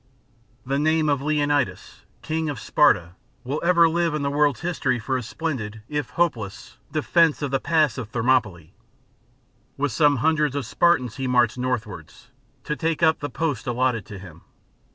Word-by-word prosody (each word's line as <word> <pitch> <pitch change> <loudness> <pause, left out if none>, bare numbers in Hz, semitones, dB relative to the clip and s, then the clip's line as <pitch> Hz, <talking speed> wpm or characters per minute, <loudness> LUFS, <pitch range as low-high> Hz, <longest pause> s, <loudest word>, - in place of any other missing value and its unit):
The 135 +2 -1
name 155 0 +2
of 140 -2 +1
Leonidas, 145 -9 -1 0.2
King 160 0 -2
of 145 - -5
Sparta, 85 +1 +2 0.3
will 140 +5 -3
ever 170 -1 +5
live 165 -1 0
in 150 - -2
the 140 - -1
world's 145 -2 +1
history 155 -7 -1
for 120 +3 -3
his 125 -3 -3
splendid, 110 -10 -4
if 150 -3 -3
hopeless, 115 - -3
defence 160 0 +2
of 140 - -2
the 135 - +1
Pass 155 -4 +1
of 115 -4 -6
Thermopylae. 110 -9 0 1.0
With 145 -1 -1
some 145 +4 +3
hundreds 150 +1 +1
of 140 -4 -2
Spartans 125 -3 +1
he 135 -1 -2
marched 125 -1 +2
northwards, 110 -5 -5 0.3
to 150 - -3
take 160 +4 -2
up 160 0 +4
the 145 - -4
post 145 -4 -3
allotted 120 -3 0
to 105 -3 -8
him. 90 -3 -12
140 Hz, 165 wpm, -23 LUFS, 120-155 Hz, 1.0 s, ever